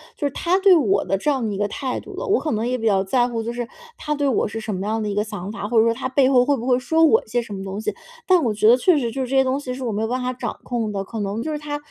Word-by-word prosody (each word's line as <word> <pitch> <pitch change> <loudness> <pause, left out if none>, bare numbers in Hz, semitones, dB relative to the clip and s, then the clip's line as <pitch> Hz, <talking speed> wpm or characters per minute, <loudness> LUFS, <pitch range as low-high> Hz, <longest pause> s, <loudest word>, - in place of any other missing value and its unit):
就 - - -3
是 285 - 0
他 350 +7 +1
对 390 -1 +6
我 210 - +3
的 195 +2 0
这 245 - -1
样 265 -5 0
的 210 - -2
一 - - -4
个 205 0 0
态 255 +4 -3
度 - - -11
了。 - - -4
我 415 - +2
可 310 - -2
能 220 +1 -1
也 250 +1 0
比 225 -2 -1
较 195 -2 +3
在 240 +5 +2
乎 230 -2 -3
就 230 - -3
是 240 0 -4 0.3
他 300 -1 -2
对 285 -1 -1
我 255 - +1
是 225 +2 -6
什 215 -1 -4
么 190 +1 -3
样 220 +1 -1
的 210 - -2
一 - - -2
个 205 - +1
想 205 -2 -6
法， 210 -1 -5
或 230 +2 0
者 - - +6
说 230 0 +2
他 240 - -4
背 260 0 +3
后 250 -2 +4
会 285 +1 +2
不 240 -2 -6
会 250 -1 +3
说 320 +6 +2
我 440 +8 +5
一 - - -27
些 240 +2 0
什 230 -3 -9
么 195 - -5
东 195 +2 -5
西。 - - -2 0.3
但 365 -2 +4
我 230 -7 0
觉 215 +1 +3
得 240 - +7
确 330 +6 +3
实 240 -5 -1
就 265 - -3
是 - - -4
这 270 - -2
些 265 - +5
东 265 +1 0
西 255 -3 -5
是 260 +1 -6
我 235 - -2
没 210 +1 -2
有 225 - 0
办 250 +2 -2
法 250 - -1
掌 255 - -5
控 230 -4 -2
的， 195 -1 -2
可 225 +3 -7
能 205 +2 -2
就 310 - -3
是 300 - -3
他 295 0 -4
240 Hz, 400 characters per minute, -22 LUFS, 215-270 Hz, 0.3 s, 得